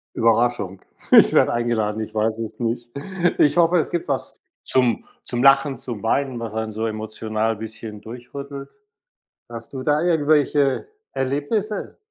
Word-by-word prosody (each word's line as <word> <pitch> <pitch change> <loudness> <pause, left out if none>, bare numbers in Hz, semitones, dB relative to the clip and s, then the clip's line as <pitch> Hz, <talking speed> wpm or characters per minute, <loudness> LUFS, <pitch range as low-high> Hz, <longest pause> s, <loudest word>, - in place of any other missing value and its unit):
Überraschung, 115 -4 +1 0.3
ich - - +8
werde - - +4
eingeladen, 110 -3 0
ich 110 - -8
weiß 110 +1 0
es 110 +1 -6
nicht. 120 0 -2 0.5
Ich 145 - +4
hoffe, 175 +1 +4
es 160 - 0
gibt 170 - -3
was 135 -2 -3 0.3
zum 125 -3 +1 0.2
zum 120 0 -2
Lachen, 135 -1 +5
zum 120 -5 -7
Weinen, 130 +2 0
was 115 -2 -5
einen 110 0 -3
so 110 +2 -2
emotional 110 0 -2
bisschen 110 0 -8
durchrüttelt. 140 - -9 0.7
Hast 115 -1 -9
du 130 -1 -5
da 150 +2 +2
irgendwelche 150 -4 +2 0.3
Erlebnisse? 145 - -2
120 Hz, 145 wpm, -22 LUFS, 110-140 Hz, 0.7 s, ich